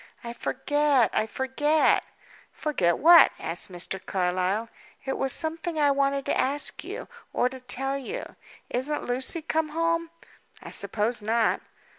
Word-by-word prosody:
"I 235 0 -6
forget! 280 0 +1
I 215 - +1
forget!" 295 +6 +2 0.5
"Forget 180 - 0
what?" 335 +2 +8
asked 170 +3 +2
Mr. 180 +1 -4
Carlyle. 185 +4 -1 0.4
"It 270 - -2
was 270 0 -1
something 325 +1 -2
I 290 -2 +4
wanted 275 0 0
to - - 0
ask 285 +2 -1
you, - - -7 0.3
or 250 - +2
to 260 0 -9
tell 270 +2 -1
you. 435 - -7 0.4
Isn't 280 +5 -1
Lucy 260 +7 -2
come 315 0 -1
home?" 330 +1 0 0.5
"I - - -9
suppose 220 +2 0
not." 225 +2 +1
270 Hz, 140 wpm, -26 LUFS, 230-300 Hz, 0.5 s, what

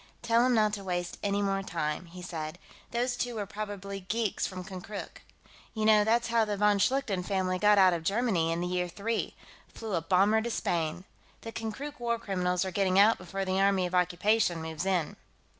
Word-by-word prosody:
"Tell 230 +1 +3
him 250 -1 +3
not 215 -2 +3
to 200 -2 -4
waste 175 -2 -3
any 200 0 0
more 195 0 0
time," 165 -2 -3
he 180 +2 -10
said. 160 -2 -5 0.3
"Those 245 +1 -1
two 245 -1 -3
were 210 -2 -2
probably 200 -1 -6
geeks 210 +2 -1
from 185 -1 -7
Konkrook. 190 +2 -8 0.5
You 215 -1 -1
know, 215 -1 +6
that's 230 +2 +2
how 230 -1 +3
the 210 -1 -2
von 205 0 +3
Schlichten 230 -4 +1
family 185 -1 -1
got 210 +1 +5
out 185 -2 +6
of 170 - -2
Germany, 195 -3 +1
in 165 +1 -1
the 175 - -1
Year 180 0 -1
Three 210 +6 -3 0.4
flew 220 -3 -6
a 170 - +1
bomber 195 +6 +3
to 235 - -3
Spain. 170 -5 -1 0.4
The 225 - -7
Konkrook 225 +7 -6
war 235 -1 0
criminals 180 -3 -1
are 190 - -3
getting 190 0 +1
out 210 +3 +6
before 195 +2 -4
the 185 0 0
Army 195 -2 +3
of 180 - -5
Occupation 180 +1 +2
moves 160 +3 -4
in." 180 -5 0
195 Hz, 200 wpm, -29 LUFS, 180-220 Hz, 0.5 s, know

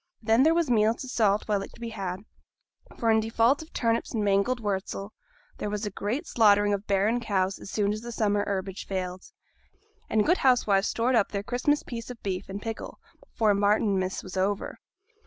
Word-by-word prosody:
Then 225 +2 +3
there 320 +4 +5
was 340 -2 +2
meat 225 -1 +3
to 260 - -7
salt 215 -5 +2
while 205 -2 +1
it - - -8
could - - -18
be 235 -1 -5
had; 190 -3 -5 0.8
for, 230 -1 +2
in 220 - +4
default 230 +5 +2
of 315 - -12
turnips 230 0 -1
and 215 - 0
mangold 200 +5 +2
wurzel, 200 -1 -3 0.5
there 210 - -2
was 210 +1 -3
a 205 - -3
great 230 - -3
slaughtering 205 -6 +4
of 200 0 -3
barren 205 +4 +2
cows 195 -4 -1
as - - -10
soon 205 0 0
as 215 - -5
the 240 +1 -7
summer 205 -3 +1
herbage 195 -1 -4
failed; 185 -1 -4 0.8
and 215 -1 +2
good 355 +3 +3
housewives 215 -6 +3
stored 240 +3 0
up 225 -5 +3
their 200 -1 -3
Christmas 250 +6 0
piece 230 -1 -7
of 245 -2 -8
beef 190 -1 -3
in 195 +1 -5
pickle 225 +1 -6 0.2
before 225 - +1
Martinmas 200 -2 +1
was 185 0 -9
over. 195 +2 -1
210 Hz, 195 wpm, -27 LUFS, 200-235 Hz, 0.8 s, there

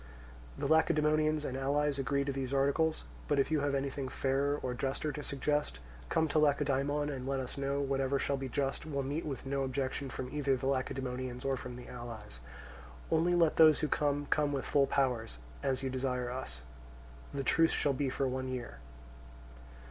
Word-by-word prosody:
The - - -3
Lacedaemonians 155 -1 +3
and 130 - -3
allies 140 +1 +1
agree 140 +2 +1
to 140 - 0
these 135 -1 -3
articles; 140 +4 +2 0.2
but 145 - +2
if 135 +2 +2
you 155 - +3
have 140 -1 0
anything 135 -1 -2
fairer 140 +2 +1
or 125 - -1
juster 135 +4 -2
to 150 +1 -5
suggest, 145 - -1 0.3
come 160 - +2
to 155 - +3
Lacedaemon 145 0 +2
and 130 -2 -5
let 135 0 0
us 130 -2 -5
know: 140 0 -1
whatever 135 0 +1
shall 140 - 0
be 135 -1 -4
just 135 +2 -1
will 140 -3 -1
meet 145 +4 -3
with 135 -2 -5
no 135 0 -1
objection 135 +1 -2 0.2
either 140 -3 +1
from 130 +2 -1
the - - +4
Lacedaemonians 130 -1 -3
or 135 -1 +2
from 125 -1 -7
the 125 - -10
allies. 115 - -8 0.7
Only 170 +2 +3
let 165 -3 +3
those 155 -2 +7
who 155 - +1
come 145 -1 +1
come 150 -1 +2
with 140 -2 -2
full 140 -1 +3
powers, 125 - 0 0.2
as 135 -1 -1
you 130 - -1
desire 125 -1 -1
us. 65 - -5 0.7
The 140 -1 -3
truce 165 +4 +4
shall 145 - +1
be 135 0 0
for 135 +1 0
one 130 0 -2
year. 125 -2 -5
135 Hz, 185 wpm, -33 LUFS, 130-145 Hz, 0.7 s, those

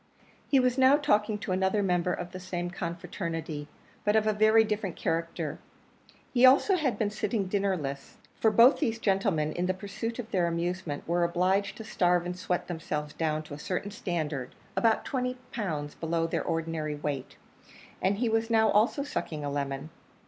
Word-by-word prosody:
He 275 - +4
was 255 0 +2
now 265 +2 +7
talking 215 -8 +2
to 205 - -5
another 190 +2 +1
member 180 -1 +1
of 175 0 -4
the 185 - -7
same 175 -1 -4
confraternity, 170 -4 -4 0.4
but 210 +1 +2
of 220 -1 +3
a 215 - +2
very 215 +1 +5
different 210 -4 -2
character. 165 -2 -2 0.7
He 245 -1 +3
also 275 +9 +7
had 300 -8 0
been 210 -2 0
sitting 215 -1 -1
dinnerless, 185 -9 -2 0.2
for 220 - +4
both 230 +5 +6
these 230 -7 0
gentlemen, 195 -8 +1
in 175 +2 -1
the 185 - 0
pursuit 205 +4 -5
of 240 -3 -6
their 180 -3 +2
amusement, 170 -2 -3
were 175 +1 +2
obliged 185 +4 +1
to 220 - -7
starve 180 -5 +2
and 180 0 -3
sweat 180 -1 -2
themselves 150 -3 -4
down 155 -1 -1
to 155 - -10
a 145 - -7
certain 190 +5 -3
standard, 155 -10 -3 0.2
about 225 -1 +2
twenty 250 -2 -2
pounds 155 - -3
below 165 0 -1
their 165 - -1
ordinary 165 -2 -2
weight, 145 -3 -4 0.7
and 195 +2 +2
he 240 +2 +1
was 225 0 +1
now 220 -2 +4
also 225 +7 +3
sucking 155 - -4
a 145 - -2
lemon. 140 +1 -3
185 Hz, 180 wpm, -29 LUFS, 165-220 Hz, 0.7 s, now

